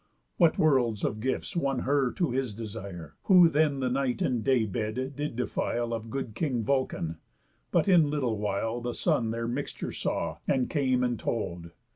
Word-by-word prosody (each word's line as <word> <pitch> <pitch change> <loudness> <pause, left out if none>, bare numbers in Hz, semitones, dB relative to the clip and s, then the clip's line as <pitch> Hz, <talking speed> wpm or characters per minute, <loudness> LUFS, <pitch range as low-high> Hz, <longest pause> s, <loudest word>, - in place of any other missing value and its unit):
What 170 -3 +4
worlds 125 -8 +2
of 110 - -1
gifts 130 - -2
won 135 -6 0
her 135 -2 +2
to 170 -8 0
his 125 -4 -2
desire, 100 -8 -7
Who 180 -3 +8
then 150 -3 +2
the 130 - +1
night 130 -1 0
and 120 -4 0
day 130 -4 +3
bed 110 +6 -3
did 145 -3 -3
defile 120 -1 -1
Of 115 0 -4
good 130 -2 -4
king 125 -4 -1
Vulcan. 110 - -1 0.5
But - - +2
in 170 -6 +5
little 130 -8 -1
while 105 +3 -1
The 120 0 -3
Sun 115 - +1
their 115 +1 -2
mixture 130 +4 -4
saw, - - -2
and 130 -2 +1
came 130 -4 +2
and 120 -2 0
told. 85 -7 -3
125 Hz, 175 wpm, -28 LUFS, 110-140 Hz, 0.5 s, Who